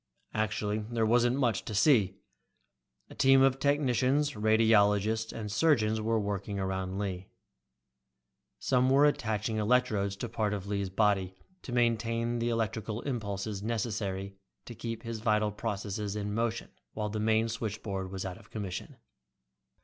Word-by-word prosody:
Actually 105 0 -1
there 115 -2 +1
wasn't 120 +2 +3
much 115 -8 +1
to 110 - -5
see. 105 -4 +4 1.0
A - - -8
team 135 0 +5
of 135 0 +3
technicians, 140 0 +2
radiologists 110 -1 +3
and 105 -2 -5
surgeons 110 -5 +2
were 110 +1 +1
working 100 -1 -3
around 95 0 -2
Lee. 95 -2 -3 1.3
Some 130 -1 +2
were 140 +2 +5
attaching 110 -6 0
electrodes 105 -3 +1
to 120 - -4
parts 110 -2 -1
of 100 -2 -6
Lee's 100 -1 -2
body 95 -2 +1 0.3
to - - -8
maintain 115 0 +1
the 120 +1 0
electrical 110 -1 -2
impulses 105 -5 -3
necessary 100 -3 -3 0.3
to 120 - -8
keep 115 0 -6
his 115 -1 -5
vital 105 -1 +1
processes 105 -1 -4
in 105 -1 -3
motion 115 +1 -2 0.2
while 105 -1 -2
the 110 +1 -3
main 110 +1 +2
switchboard 105 -4 -4
was 95 -1 -4
out 90 -1 -6
of - - -19
commission. 100 -4 -6
110 Hz, 140 wpm, -30 LUFS, 100-115 Hz, 1.3 s, team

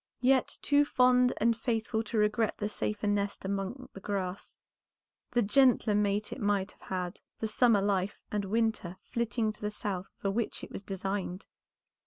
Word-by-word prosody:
Yet, 260 +1 +3
too 290 0 +5
fond 250 -2 +4
and 230 +1 +3
faithful 225 -1 -1
to 220 +1 -3
regret 210 +1 +2
the 210 - -1
safer 210 0 -2
nest 205 -1 0
among 200 +7 -3
the - - -8
grass, 195 -1 -4 0.7
the 240 -1 +2
gentler 240 0 +4
mate 205 0 +1
it 265 - -8
might 200 -2 +1
have - - -24
had, 180 0 -3 0.2
the 220 - -2
summer 215 -2 +4
life 200 -1 0
and 205 -1 -1
winter 220 -4 0
flitting 235 -1 -1
to 215 - -16
the 210 - -1
south 195 -3 -4
for 195 - -1
which 225 +3 -2
it - - -8
was - - -6
designed." 195 -1 -3
210 Hz, 170 wpm, -30 LUFS, 195-230 Hz, 0.7 s, too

